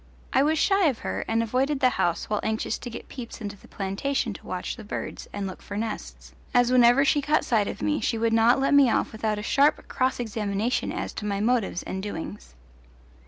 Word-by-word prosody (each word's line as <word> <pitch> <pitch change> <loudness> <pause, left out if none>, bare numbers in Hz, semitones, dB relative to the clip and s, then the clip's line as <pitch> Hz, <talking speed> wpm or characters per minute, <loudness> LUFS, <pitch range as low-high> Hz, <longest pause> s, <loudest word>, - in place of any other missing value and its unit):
I 265 - +5
was 310 +3 +2
shy 390 +1 +3
of 265 -6 +1
her - - -2
and 225 +1 +1
avoided 265 +5 0
the 255 -2 +5
house 175 -6 0
while 210 -1 0
anxious 220 0 -2
to 245 - -6
get 235 - -8
peeps 245 -3 -8
into 205 -2 -5
the - - -18
plantation 215 +5 -2
to - - -12
watch 180 -1 -4
the 230 - -10
birds 205 - -6
and 205 -1 -4
look 190 - -7
for 205 - -6
nests, - - -5 0.2
as 245 0 +4
whenever 250 +2 +6
she 290 +1 +3
caught 300 +2 +1
sight 215 -4 +2
of - - -5
me 300 0 +1
she 230 - 0
would 225 0 +1
not 230 +3 +5
let 275 +2 +2
me 280 -3 +7
off - - +1
without 220 -1 -2
a 210 - -5
sharp 280 +6 +2
cross 255 0 0
examination 220 0 -1
as - - -4
to 210 - -5
my 200 -1 -1
motives 220 -4 0
and 190 - -4
doings. 200 - -7
225 Hz, 220 wpm, -26 LUFS, 205-260 Hz, 0.2 s, me